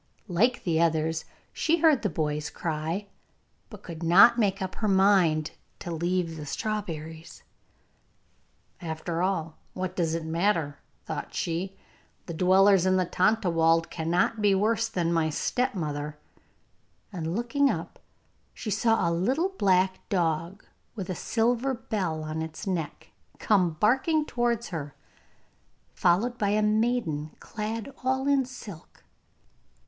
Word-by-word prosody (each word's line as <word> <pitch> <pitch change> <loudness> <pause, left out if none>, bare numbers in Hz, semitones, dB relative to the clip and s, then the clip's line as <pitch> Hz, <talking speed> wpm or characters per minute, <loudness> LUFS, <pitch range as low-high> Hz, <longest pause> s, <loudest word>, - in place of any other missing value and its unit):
Like 235 +8 +1
the 165 -2 +1
others, 160 -1 +1 0.3
she 330 +1 +1
heard 310 -5 +4
the 210 - 0
boy's 150 -2 -2
cry, 165 +4 -3 0.6
but 210 -5 -12
could 165 -2 -8
not 200 +8 +7
make 195 -3 +1
up 190 -1 -4
her 215 - -1
mind 190 -6 +3 0.3
to 175 - -6
leave 170 0 -1
the 150 - -6
strawberries. 165 -4 -5 1.4
'After 165 0 -3
all, 165 -4 -2
what 185 0 -4
does 165 -3 0
it 165 -1 -4
matter?' 165 -3 0 0.3
thought - - -5
she. 180 +3 -3 0.5
'The 170 - -6
dwellers 190 +2 +4
in 185 - +3
the 185 - +2
Tontlawald 170 -5 +2
cannot 175 +7 0
be 205 -2 +4
worse 220 +3 +1
than 175 -6 -1
my 160 -1 +2
stepmother'; 150 - -2 1.0
and 165 -1 -3
looking 275 +5 +2
up - - -4 0.6
she 215 - -5
saw 225 -2 +2
a 170 - +1
little 260 - +1
black 190 - +2
dog 170 +1 -1 0.3
with 190 -4 -4
a - - -1
silver 240 +6 0
bell 185 -9 -3
on 155 +1 -4
its 160 +3 -6
neck 170 -6 -4 0.3
come 185 -6 +2
barking 265 - +2
towards 240 -3 -1
her, 150 -5 -6 1.0
followed 230 +8 +1
by 205 - +1
a 210 +1 +2
maiden 210 -9 0
clad 220 +4 -5
all 265 +1 0
in 280 -2 +3
silk. 215 -9 -11
185 Hz, 135 wpm, -27 LUFS, 165-220 Hz, 1.4 s, not